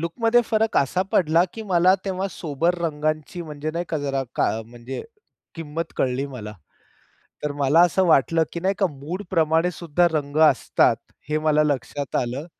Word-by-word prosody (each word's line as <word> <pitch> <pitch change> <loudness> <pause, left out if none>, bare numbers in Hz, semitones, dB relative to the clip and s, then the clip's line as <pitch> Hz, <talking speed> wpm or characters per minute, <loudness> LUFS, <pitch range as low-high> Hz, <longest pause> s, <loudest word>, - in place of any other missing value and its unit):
लूकमध्ये 225 +8 +2
फरक 220 0 0
असा 160 +7 +2
पडला 165 0 +4
की 225 - -6
मला 180 +1 +5
तेव्हा 190 0 -2
सोबर 165 +2 -1
रंगांची 155 +2 -2
म्हणजे 155 -1 -5
नाही 170 +2 -3
का 160 - -1
जरा 140 -2 -1
का - - +3 0.2
म्हणजे 120 +2 -8 0.5
किंमत 165 0 -5
कळली 130 +2 0
मला. 110 -6 -8 0.9
तर 150 - -1
मला 145 +3 +3
असं 175 +2 +3
वाटलं, 160 +1 +3
की 170 - -4
नाही 190 +3 +1
का 195 - +3
मूडप्रमाणेसुद्धा 165 +1 0
रंग 145 -1 -2
असतात, - - +2 0.3
हे 155 - +1
मला 155 -1 +3
लक्षात 145 0 -2
आलं. 125 +5 -2
155 Hz, 150 wpm, -23 LUFS, 145-175 Hz, 0.9 s, मला